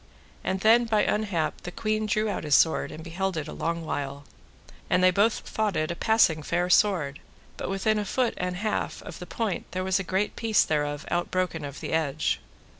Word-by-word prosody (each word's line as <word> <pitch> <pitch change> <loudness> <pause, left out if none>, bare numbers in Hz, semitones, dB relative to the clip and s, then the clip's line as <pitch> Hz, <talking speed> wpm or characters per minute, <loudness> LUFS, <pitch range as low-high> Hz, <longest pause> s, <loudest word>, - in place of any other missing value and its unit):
And 190 0 -1
then 230 +3 +5
by 220 -2 +2
unhap 200 -7 -1
the 180 - -6
queen 215 +2 -1
drew 215 +1 +1
out 205 - -2
his 150 -2 +3
sword 160 - +3
and 155 +1 -8
beheld 185 +2 -2
it 155 -1 -3
a - - -7
long 165 0 -2
while, 140 -1 -4 0.7
and - - +3
both 210 +4 +2
they - - -11
thought 215 -4 0
it 155 +1 0
a - - -3
passing 195 -7 +3
fair 175 +4 0
sword; 165 -9 +3 0.4
but - - -5
within 210 +3 +1
a - - -1
foot 245 +3 0
and 180 0 -2
an 180 - -6
half 215 - -2
of 170 - -9
the 180 - -8
point 220 -5 -2
there 185 0 -1
was 190 0 +1
a - - -2
great 190 +3 -1
piece 225 -2 +3
thereof 145 -1 -1
out 175 0 0
broken 180 -4 -1
of 140 0 -7
the - - -4
edge. 155 -2 0
180 Hz, 215 wpm, -27 LUFS, 160-210 Hz, 0.7 s, then